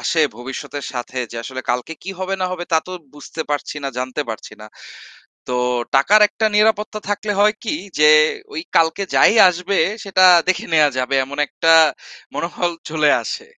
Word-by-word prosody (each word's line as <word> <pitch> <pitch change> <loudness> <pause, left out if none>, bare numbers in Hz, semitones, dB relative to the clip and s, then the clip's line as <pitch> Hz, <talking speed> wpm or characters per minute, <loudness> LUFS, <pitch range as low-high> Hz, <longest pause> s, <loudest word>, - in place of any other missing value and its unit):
আসে 160 -2 +1
ভবিষ্যতের 135 +3 -7
সাথে 125 +1 -6
যে 115 - -9
আসলে 130 -1 -6
কালকে 125 +6 -3
কি 195 - -6
হবে, 190 +1 -3
না 185 - 0
হবে, 175 -1 -5
তা 160 - +5
তো 185 - -8 0.2
বুঝতে 145 +2 -9
পারছি 145 0 -3
না, - - -1
জানতে 130 +3 -3
পারছি 110 - -7
না। 105 - -10 0.8
তো 125 - -3 0.4
টাকার 200 +11 +4
একটা 220 +1 -1
নিরাপত্তা 215 0 +1
থাকলে 205 +1 -2
হয় 210 +1 +4
কি 230 - -2 0.2
যে 150 0 +6 0.4
ওই 160 - -3 0.2
কালকে 165 +4 +2
যাই - - +5
আসবে 180 +2 -2 0.3
সেটা 190 -1 +3 0.2
দেখে 185 - 0
নেওয়া 150 -2 +4
যাবে। 130 +2 -1
এমন 140 +2 -10
একটা 165 +2 +1 0.6
মনোবল 175 +1 -2 0.2
চলে 155 -2 +2
আসে। 455 0 -6
160 Hz, 170 wpm, -19 LUFS, 140-195 Hz, 0.8 s, যে